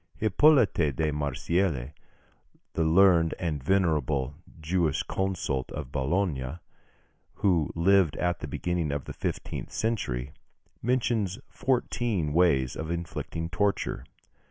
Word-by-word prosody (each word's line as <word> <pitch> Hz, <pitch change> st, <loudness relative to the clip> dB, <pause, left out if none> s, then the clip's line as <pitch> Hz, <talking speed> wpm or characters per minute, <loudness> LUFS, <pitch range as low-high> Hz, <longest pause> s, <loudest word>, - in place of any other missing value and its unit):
Hippolyte 110 Hz, -, +4 dB
de 75 Hz, +3 st, 0 dB
Marsillis, 75 Hz, 0 st, -1 dB, 0.8 s
the 80 Hz, -, +1 dB
learned 85 Hz, 0 st, +5 dB
and 75 Hz, -6 st, -3 dB
venerable 75 Hz, -6 st, +1 dB, 0.3 s
jurisconsult 85 Hz, -2 st, -1 dB
of 70 Hz, -3 st, -6 dB
Bologna, 70 Hz, -1 st, -1 dB, 0.8 s
who 85 Hz, -6 st, +2 dB
lived 90 Hz, -2 st, +4 dB
at 90 Hz, -2 st, -1 dB
the -, -, -5 dB
beginning 85 Hz, -4 st, -2 dB
of 70 Hz, -1 st, -3 dB
the -, -, -6 dB
fifteenth -, -, -4 dB
century, 70 Hz, -, -2 dB, 0.5 s
mentions 115 Hz, -5 st, 0 dB
fourteen 115 Hz, -, 0 dB
ways 75 Hz, -7 st, +3 dB
of 80 Hz, -, -5 dB
inflicting 85 Hz, -1 st, -4 dB
torture. 100 Hz, +4 st, -1 dB
85 Hz, 105 wpm, -28 LUFS, 75-95 Hz, 0.8 s, learned